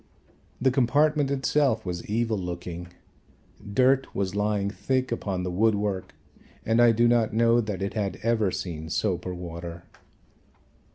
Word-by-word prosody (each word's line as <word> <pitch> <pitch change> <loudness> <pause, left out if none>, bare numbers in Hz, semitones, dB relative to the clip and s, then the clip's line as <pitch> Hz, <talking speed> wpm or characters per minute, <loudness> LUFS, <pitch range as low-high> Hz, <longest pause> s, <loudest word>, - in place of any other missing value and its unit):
The 130 +1 +3
compartment 145 +3 +2
itself 135 -4 +1
was 90 -1 -4
evil 110 0 0
looking. 90 -1 -6 0.8
Dirt 130 +6 +2
was 95 -2 -1
lying 105 -1 0
thick 130 +3 -1
upon 95 -5 -2
the 90 - -2
wood 110 +4 +3
work 100 -2 -3 0.5
and 115 +2 +3
I 120 -1 +7
do 120 +1 +3
not 120 -2 +2
know 115 +1 +4
that 105 -4 -4
it 100 - -3
had 100 -3 -2
ever 110 -3 +2
seen 80 -4 -5
soap 90 0 -1
or 90 - -4
water. 85 -1 -7
105 Hz, 150 wpm, -26 LUFS, 90-120 Hz, 0.8 s, I